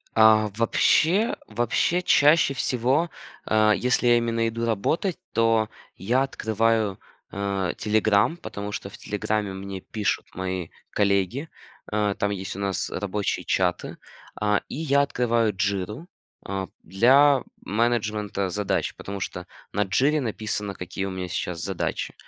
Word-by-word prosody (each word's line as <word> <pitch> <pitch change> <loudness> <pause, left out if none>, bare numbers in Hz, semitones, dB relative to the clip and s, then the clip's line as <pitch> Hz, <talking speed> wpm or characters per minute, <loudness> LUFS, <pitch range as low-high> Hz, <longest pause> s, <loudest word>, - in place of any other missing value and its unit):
А, 110 -1 +6
вообще 165 - +3
вообще, 120 +10 +1
чаще 150 -3 +5
всего, 130 +6 +1 0.4
э, 110 0 +4
если 125 0 +1
я 120 0 +6
именно 115 -1 0
иду 115 +1 -3
работать, 155 - 0
то 115 -1 +2 0.3
я 120 +9 +1
открываю, 110 -5 0 0.3
э, 100 -2 -1
"Телеграм", 110 +5 +2
потому 105 - -6
что 100 - -5
в - - -12
"Телеграме" 105 -1 -2
мне 95 0 -6
пишут 105 +2 -2
мои 95 -2 -3 0.2
коллеги. 100 - +1 0.4
Э, 105 -1 +1
там 100 0 +1
есть 95 -1 -5
у - - -6
нас 100 -2 -1
рабочие 100 +1 -2
чаты, 90 -2 0 0.4
а, 105 -1 +1
и - - -7
я 140 -2 +2
открываю 120 -5 +1
"Джиру", 105 - -2 0.4
а, 95 -1 -3 0.2
для 135 +7 +5 0.2
менеджмента 105 -3 -1
задач, 100 +1 -1
потому 100 -1 -7
что - - -5 0.2
на 105 +1 +1
"Джире" 140 +10 +2
написано, 105 -4 -3
какие 95 +2 -5
у 95 - -3
меня 90 -1 -5
сейчас 85 0 -3
задачи. - - -3
110 Hz, 135 wpm, -25 LUFS, 100-120 Hz, 0.4 s, А